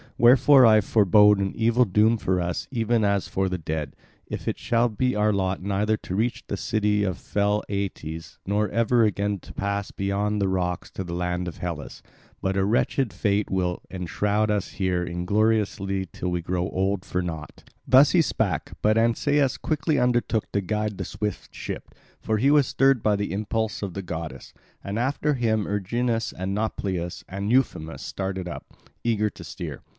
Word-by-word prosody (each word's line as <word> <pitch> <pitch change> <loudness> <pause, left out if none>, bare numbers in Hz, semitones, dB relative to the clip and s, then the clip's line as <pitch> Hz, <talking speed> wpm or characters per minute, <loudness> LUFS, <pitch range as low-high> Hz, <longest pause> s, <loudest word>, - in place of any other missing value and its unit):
Wherefore 130 +2 +7
I 110 -1 +6
forebode 105 0 +5
an 95 -1 0
evil 115 +2 +3
doom 110 +3 +3
for 95 -3 0
us 85 0 -3
even 115 -2 +1
as 100 -1 +1
for 95 0 -1
the 90 - -2
dead, 75 -3 -4 0.3
if - - -6
it - - -1
shall 120 0 +2
be 125 +4 0
our 105 0 +2
lot 95 -1 -1
neither 105 +2 +1
to 95 - -6
reach 115 +4 -1
the 100 - -4
city 105 0 +1
of 95 -3 -1
fell 105 +1 0
Aeetes, 80 -6 -4
nor 105 +2 0
ever 115 +1 +3
again 100 -1 0
to - - -13
pass 100 0 -2
beyond 100 +2 -1
the 100 - +1
rocks 90 -2 -2
to 95 - -5
the 85 -1 -6
land 90 0 -2
of 85 - -6
Hellas, 85 -4 -6 0.4
but 95 0 -1
a 95 - +2
wretched 120 +3 +1
fate 100 0 0
will 90 -2 -1
enshroud 100 +4 -1
us 105 -2 -1
here 90 -2 0
ingloriously 100 +1 0
till 90 - -4
we 90 -1 -1
grow 90 +1 -2
old 95 0 -1
for 90 0 -2
naught." 80 -3 -7 0.2
Thus 135 +3 +7
he 175 - +5
spake, 100 - -1
but 110 +1 +4
Ancaeus 135 +4 +2
quickly 155 0 0
undertook 120 -3 +1
to 100 - 0
guide 105 +1 -2
the - - -3
swift 105 -1 -5
ship; - - -7 0.2
for 110 - -1
he 135 +6 +3
was 145 -3 +5
stirred 135 -2 +3
by 105 -1 +2
the 100 -3 -2
impulse 110 +2 -2
of 100 -4 -4
the 100 - -4
goddess. 80 -2 -6 0.3
And 100 +3 -3
after 145 +4 0
him 110 -5 +1
Erginus 115 +3 -1
and 95 +2 -4
Nauplius 95 -5 -3
and 100 +3 -3
Euphemus 80 - 0
started 95 +1 -4
up, 85 - -8 0.3
eager 105 -3 +1
to - - -11
steer. - - -7
100 Hz, 180 wpm, -25 LUFS, 95-110 Hz, 0.4 s, Wherefore